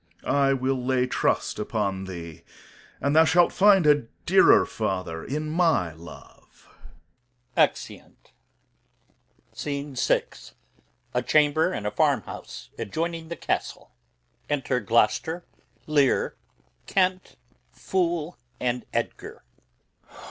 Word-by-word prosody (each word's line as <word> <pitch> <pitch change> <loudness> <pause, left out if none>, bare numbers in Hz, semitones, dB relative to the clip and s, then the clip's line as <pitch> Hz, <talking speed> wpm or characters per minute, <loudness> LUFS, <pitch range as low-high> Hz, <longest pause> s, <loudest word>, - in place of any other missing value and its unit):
Corn. - - 0
I 140 -1 +3
will 130 -1 -1
lay 125 0 +1
trust 130 - -1
upon 100 -3 -2
thee, 85 -3 -8 0.6
and 140 +2 0
thou 160 - +8
shalt 170 +2 +3
find 195 -3 +5
a 145 -5 +4 0.2
dearer - - +6
father 90 -4 -3
in 155 +3 -3
my 155 - +1
love. 85 +1 -15 0.9
Exeunt. - - -1 1.2
Scene 140 -1 -5
VI. 125 - +2 0.9
A - - +1 0.7
farmhouse - - -2
near - - -2
Gloucester's 165 - -4
Castle. - - -3 0.6
Enter 135 -3 0
Gloucester, 125 - +1 0.4
Lear, 145 -3 +2 0.5
Kent, 185 -1 0 0.4
Fool, 175 -3 -2 0.2
and 125 -1 -2
Edgar. - - -4
140 Hz, 95 wpm, -25 LUFS, 115-165 Hz, 1.2 s, thou